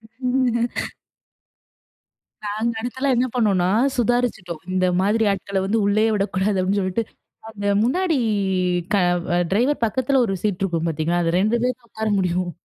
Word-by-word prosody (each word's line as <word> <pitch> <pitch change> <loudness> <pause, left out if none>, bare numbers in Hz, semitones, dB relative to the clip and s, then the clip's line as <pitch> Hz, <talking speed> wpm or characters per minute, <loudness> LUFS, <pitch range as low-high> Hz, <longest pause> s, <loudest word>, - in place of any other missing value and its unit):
ஆமங்க. 245 +1 -1 1.8
நாங்க 215 +3 -1
அடுத்தெல்லாம் 260 +3 -1
என்ன 250 +2 +2
பண்ணோம்னா 195 -7 +2 0.3
சுதாரிச்சுட்டோம். 235 -8 -1
இந்த 185 0 +2
மாதிரி 210 +4 +2
ஆட்கள 195 0 -2
வந்து 220 +4 +1
உள்ளேயே 215 +2 +2
விடக்கூடாது 195 0 0
அப்படின்னு 195 +2 +1
சொல்லிட்டு, 185 +4 -1 0.5
அந்த 205 -2 -6 0.2
முன்னாடி 330 +7 +1 0.8
க - - +5 0.5
டிரைவர் 245 +8 +1
பக்கத்தில 260 +4 +1
ஒரு 195 - -1
சீட் 205 -4 -1
இருக்கும் 170 -3 -1
பார்த்தீங்களா? 165 +2 0
அந்த 165 0 0
2 215 +4 +2
பேர் 250 -1 0
தான் 235 - -27
உட்கார 220 0 -3
முடியும். 180 -1 0
215 Hz, 140 wpm, -22 LUFS, 190-245 Hz, 1.8 s, க